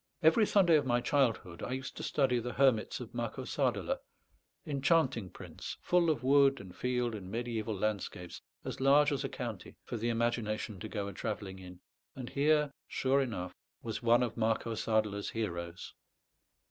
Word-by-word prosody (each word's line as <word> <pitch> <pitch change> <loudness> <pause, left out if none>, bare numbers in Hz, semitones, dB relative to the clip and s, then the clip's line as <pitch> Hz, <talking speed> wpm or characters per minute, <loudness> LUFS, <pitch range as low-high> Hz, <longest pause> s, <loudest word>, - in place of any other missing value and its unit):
Every 165 +7 +5
Sunday 175 -6 +5
of 145 - 0
my 120 -1 +3
childhood 120 - 0
I 125 - -3
used 130 0 -5
to - - -5
study 130 -4 +1
the 125 +1 -4
Hermits 130 -5 +2
of - - -8
Marco - - -3
Sadeler - - 0 0.7
enchanting 140 - +1
prints, - - -8
full 175 -2 +3
of 145 -6 0
wood 140 0 +5
and 95 -2 -11
field 125 -2 -1
and 95 -3 -7
mediæval 115 -3 -3
landscapes, 95 -4 -3 0.2
as - - -5
large 145 +2 +5
as 140 -1 -1
a 135 - -2
county, 115 -6 -6
for 120 - -5
the 115 +2 -1
imagination 115 -3 -1
to 110 - -6
go 100 -2 -3
a 100 - -6
travelling 100 -2 -4
in; 90 -1 -11 0.3
and 130 -2 -7
here, 150 0 +3 0.2
sure 135 +1 +2
enough, 95 -9 -3 0.3
was 115 -2 -4
one 120 +1 +4
of 120 - -2
Marco 115 0 0
Sadeler's 110 -2 0
heroes. 85 -5 -4
120 Hz, 170 wpm, -32 LUFS, 105-135 Hz, 0.7 s, Every